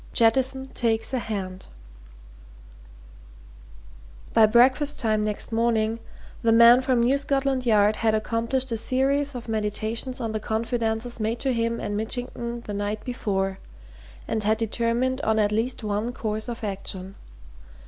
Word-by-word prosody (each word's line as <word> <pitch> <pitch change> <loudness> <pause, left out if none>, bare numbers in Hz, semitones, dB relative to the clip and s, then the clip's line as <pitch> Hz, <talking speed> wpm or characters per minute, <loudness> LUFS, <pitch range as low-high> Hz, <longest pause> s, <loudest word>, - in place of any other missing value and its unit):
JETTISON 265 +3 +2
TAKES 225 +1 0
A 260 - +1
HAND 195 -5 -5 2.7
By 225 -1 +6
breakfast 260 +6 +3
time 215 -3 +1
next 210 +1 -3
morning 225 -1 +1 0.4
the 230 -2 +3
man 235 +2 +7
from 255 -2 +1
New 260 +4 +2
Scotland 270 -2 0
Yard 210 -1 +4
had 220 -1 +2
accomplished 230 +4 -1
a 230 - 0
series 275 +4 0
of 240 -1 -7
meditations 220 +3 -2
on 225 -3 -3
the 215 - -2
confidences 225 +1 -2
made 220 +2 -1
to 270 -2 +1
him 230 0 -1
and 205 - -3
Mitchington 235 +1 -4
the 210 - -7
night 205 +1 -3
before 195 -6 -2 0.7
and 220 -1 0
had 215 +2 +2
determined 235 +4 0
on 220 0 +1
at 210 -1 +2
least 230 +3 -1
one 210 +3 -2
course 215 0 -3
of 235 -1 -6
action. 195 -2 -5
230 Hz, 140 wpm, -25 LUFS, 215-245 Hz, 2.7 s, man